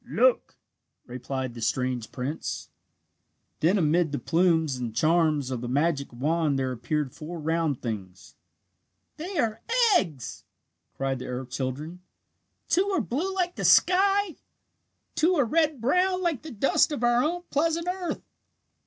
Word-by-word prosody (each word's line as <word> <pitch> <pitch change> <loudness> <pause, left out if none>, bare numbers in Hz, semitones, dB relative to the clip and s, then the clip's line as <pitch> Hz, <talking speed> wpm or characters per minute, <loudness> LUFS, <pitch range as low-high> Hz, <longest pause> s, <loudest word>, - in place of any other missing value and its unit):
"Look!" - - +2 0.5
replied 130 0 -4
the 115 - -9
strange 120 0 -1
prince. 135 +4 -4 0.9
Then 180 +6 +3
amid 165 -1 +2
the 145 - -1
plumes 160 -4 +2
and 120 -3 -5
charms 155 -2 +2
of 125 -2 -3
the 120 - -4
magic 140 +2 0
wand 150 +3 0
there 130 -1 -1
appeared 130 +3 -2
four 165 +2 -7
round 160 -3 -1
things. 95 -6 -6 0.8
"They 350 +4 -5
are 225 0 0 0.3
eggs!" 150 - -2 0.5
cried 135 -1 -1
the - - -7
earth 125 0 -5
children. 140 +7 -4 0.7
"Two 375 +3 +2
are 380 -4 +1
blue 295 - -2
like 355 -2 0
the - - -3
sky. 390 0 +4 0.8
Two 350 +4 +3
are 285 -6 +3
red 310 +2 +1
brown 365 +9 +2
like 330 -8 0
the 315 - -9
dust 255 +6 +2
of 285 -5 -3
our 240 +1 +4
own 350 +3 -1
pleasant 330 +3 +1
earth!" 360 -1 -3
165 Hz, 145 wpm, -26 LUFS, -, 0.9 s, sky